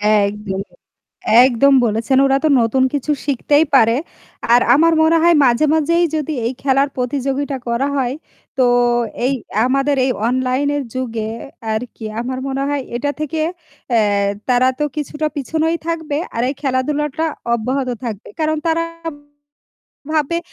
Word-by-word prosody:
একদমই, 205 -2 0 0.8
একদম 265 +2 +4
বলেছেন 230 +4 +1
ওরা 270 0 +3
তো - - +5
নতুন 235 +3 +1
কিছু 290 0 -2 0.2
শিখতেই 290 +2 +2
পারে 230 -3 +5 0.6
আর 240 - +7
আমার 330 +3 +4
মনে 320 +1 +4
হয় 340 0 +5
মাঝে, 245 +3 +3
মাঝেই 335 +2 +2
যদি 310 0 -2
এই 240 - -1
খেলার 275 +1 +2
প্রতিযোগিতা 275 +2 -2
করা 235 +3 0
হয় 255 -2 0 0.4
তো 260 - +4 0.6
এই 265 - +1 0.3
আমাদের 275 +2 +1
এই 260 - +1 0.2
অনলাইনের 260 +3 0
যুগে 230 -4 -3 0.4
আরকি 225 +1 -5 0.2
আমার 255 +2 -4
মনে 270 0 -2
হয় 285 -1 -1
এটা 285 +4 -1
থেকে 310 +1 -2 0.5
অ্যা 235 -2 +3 0.5
তারা 250 0 +4
তো 300 - +1
কিছুটা 300 +1 -3
পিছনেই 320 +4 0
থাকবে 320 -3 -2 0.2
আর 230 - -1
এই 270 - -2
খেলাধুলাটা 290 +3 -1 0.3
অব্যাহত 255 +3 -2 0.2
থাকবে 220 -3 -6
কারণ 310 0 +1
তারা 330 0 +1 1.3
ভাববে 315 +2 +1
270 Hz, 135 wpm, -18 LUFS, 245-295 Hz, 1.3 s, আর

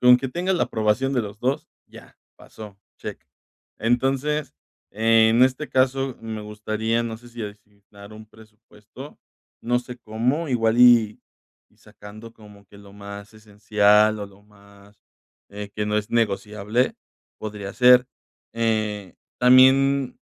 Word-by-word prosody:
con 125 0 +7
que 135 +1 -5
tenga 180 +4 -1
la 175 - 0
aprobación 110 +5 0
de 125 - +1
los 105 -1 -8
2, 135 +6 -2 0.2
ya - - -16 0.2
pasó, 105 -3 -13 0.2
check, - - -8 0.6
entonces, 135 +5 -1 0.4
en 115 +2 +3
este 130 +4 +1
caso 130 0 0
me 110 -1 -6
gustaría, 110 +2 -3
no 115 -1 -6
sé 120 0 -16
si 120 -1 -8
asignar 105 0 -13
un 110 0 -12
presupuesto, 110 +4 -15 0.4
no 120 +1 +1
sé 125 0 -10
cómo, 120 +8 -2
igual 115 -2 +1
y 120 -3 +5 0.5
y - - -33
sacando 110 +3 -13
como 105 -2 -17
que 100 - -17
lo 100 -1 -16
más 100 +1 -10
esencial, 105 0 +2
o - - -4
lo 100 +1 -20
más, 100 0 -21 0.5
eh, 105 0 -8
que 105 - -2
no 105 0 0
es 105 - -5
negociable 105 +1 -1 0.4
podría 105 -2 -7
ser, 125 0 +5 0.5
eh, 110 -4 -2 0.2
también 130 +2 +4
110 Hz, 140 wpm, -23 LUFS, 105-125 Hz, 0.6 s, con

